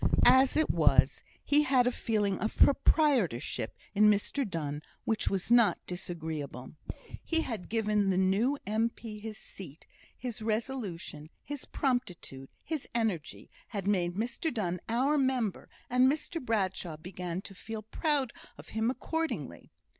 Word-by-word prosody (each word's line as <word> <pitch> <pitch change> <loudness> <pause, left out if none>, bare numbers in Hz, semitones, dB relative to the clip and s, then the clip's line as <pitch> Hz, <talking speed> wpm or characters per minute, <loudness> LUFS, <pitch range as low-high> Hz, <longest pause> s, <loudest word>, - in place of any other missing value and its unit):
As 260 +2 +6
it 315 - +3
was, - - +4 0.2
he 295 +1 +5
had 260 -4 +3
a 250 - +3
feeling 210 -5 0
of 220 +4 -2
proprietorship 250 - +3 0.2
in 210 +1 +6
Mr 210 +4 +1
Donne 150 -4 -3 0.2
which 220 -1 0
was 195 +3 -2
not 235 -3 +6
disagreeable. 160 -8 -5 0.5
He 325 -1 +1
had 225 - -5
given 210 -3 +1
the 185 - +2
new 200 +9 +2
M.P. 220 +1 -2
his 215 0 -6
seat; 165 -8 -10 0.3
his 240 -4 -5
resolution, 215 - -3
his 290 -2 -6
promptitude, 180 - -2
his 315 -4 -4
energy, 210 -10 -2 0.2
had 200 -4 -4
made 180 -4 +1
Mr 235 - -2
Donne 180 -6 -2
"our 270 +6 +2
member;" 255 -7 0 0.2
and 250 +2 +4
Mr 315 +1 -4
Bradshaw 190 -7 -1
began 180 +1 -5
to - - -8
feel 220 +3 -7
proud 275 +3 0 0.2
of - - -12
him 220 +1 0
accordingly. 320 +5 -3
215 Hz, 140 wpm, -31 LUFS, 185-255 Hz, 0.5 s, As